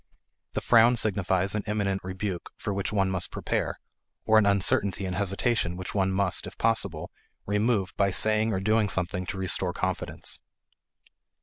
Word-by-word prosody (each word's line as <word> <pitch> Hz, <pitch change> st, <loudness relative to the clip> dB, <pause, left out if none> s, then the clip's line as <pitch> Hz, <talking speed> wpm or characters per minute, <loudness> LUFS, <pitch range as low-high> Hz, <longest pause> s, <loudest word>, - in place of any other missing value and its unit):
The -, -, -2 dB
frown 120 Hz, +1 st, +5 dB
signifies 95 Hz, -3 st, +1 dB
an 105 Hz, -, -1 dB
imminent 100 Hz, -2 st, -1 dB
rebuke 95 Hz, -1 st, -5 dB
for 105 Hz, -, -3 dB
which 100 Hz, 0 st, -2 dB
one 95 Hz, -3 st, +1 dB
must 90 Hz, -2 st, -1 dB
prepare, -, -, -3 dB, 0.5 s
or 110 Hz, 0 st, +5 dB
an 105 Hz, -, +2 dB
uncertainty 100 Hz, 0 st, +2 dB
and 90 Hz, -1 st, -3 dB
hesitation 100 Hz, -1 st, 0 dB
which 95 Hz, 0 st, -6 dB
one 95 Hz, -2 st, +1 dB
must, 95 Hz, -1 st, 0 dB
if -, -, -11 dB
possible, 100 Hz, -8 st, 0 dB, 0.3 s
remove 105 Hz, -1 st, 0 dB
by 100 Hz, -1 st, +3 dB
saying 110 Hz, +3 st, +2 dB
or 95 Hz, -, -1 dB
doing 110 Hz, +1 st, +1 dB
something 90 Hz, 0 st, -2 dB
to -, -, -4 dB
restore 95 Hz, -2 st, +1 dB
confidence. -, -, -2 dB
100 Hz, 160 wpm, -27 LUFS, 95-105 Hz, 0.5 s, frown